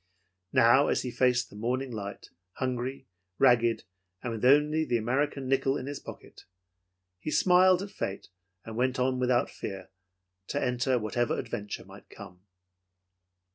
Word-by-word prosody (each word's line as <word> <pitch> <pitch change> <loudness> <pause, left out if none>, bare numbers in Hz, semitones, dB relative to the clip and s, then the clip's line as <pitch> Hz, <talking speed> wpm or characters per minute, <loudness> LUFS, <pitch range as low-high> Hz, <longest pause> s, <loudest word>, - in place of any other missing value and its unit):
Now, 125 +5 +5
as - - +1
he 125 - -4
faced 125 0 +1
the - - -13
morning 125 +4 -2
light, 100 -3 -7 0.2
hungry, 130 +1 -3 0.3
ragged, 120 -4 +4 0.4
and 125 - -3
with 110 - -6
only 150 +4 +4
the 120 -6 0
American 135 +4 -1
nickel 135 +1 +1
in 130 - -6
his 145 0 -5
pocket, - - -12 0.7
he 125 - -5
smiled 185 +2 +4
at 200 - -8
fate 95 -1 -5 0.4
and 115 - -7
went 130 +3 0
on 130 0 +1
without 125 -1 +1
fear 95 -2 -7 0.6
to 145 - -2
enter 125 0 +1
whatever 120 +2 -1
adventure 105 -3 -5
might - - -15
come. 90 0 -12
125 Hz, 145 wpm, -29 LUFS, 115-135 Hz, 0.7 s, Now